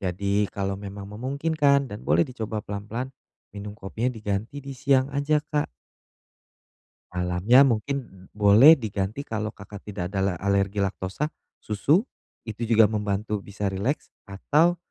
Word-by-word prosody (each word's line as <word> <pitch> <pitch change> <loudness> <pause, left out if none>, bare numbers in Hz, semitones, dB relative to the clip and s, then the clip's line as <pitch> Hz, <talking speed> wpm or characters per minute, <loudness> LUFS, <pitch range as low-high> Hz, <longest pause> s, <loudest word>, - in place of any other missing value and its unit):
Jadi, 100 +2 0
kalau 95 -1 -2
memang 100 0 -8
memungkinkan 140 +4 +1
dan 105 +1 -8
boleh - - +4
dicoba 110 -6 -4
pelan-pelan 110 +6 -5 0.4
minum 105 0 -7
kopinya 110 +5 -2
diganti 110 +5 -3
di 140 - -8
siang 135 0 +2
aja, 145 +2 +1
Kak. 150 -1 -1 1.5
Malamnya 90 +9 +4
mungkin 130 +3 0 0.4
boleh 110 +10 +8
diganti 110 +2 -3
kalau 110 -1 -3
Kakak 100 -1 -11
tidak 95 -2 -5
ada 95 - 0
la 95 -1 +1
alergi 100 +1 0
laktosa, 100 +6 -1 0.3
susu, 145 - +1 0.4
itu 110 0 -7
juga 110 -1 +6
membantu 105 0 -1
bisa 100 +1 -6
rileks, 100 +9 -2 0.2
atau 155 - +2
105 Hz, 135 wpm, -25 LUFS, 100-135 Hz, 1.5 s, boleh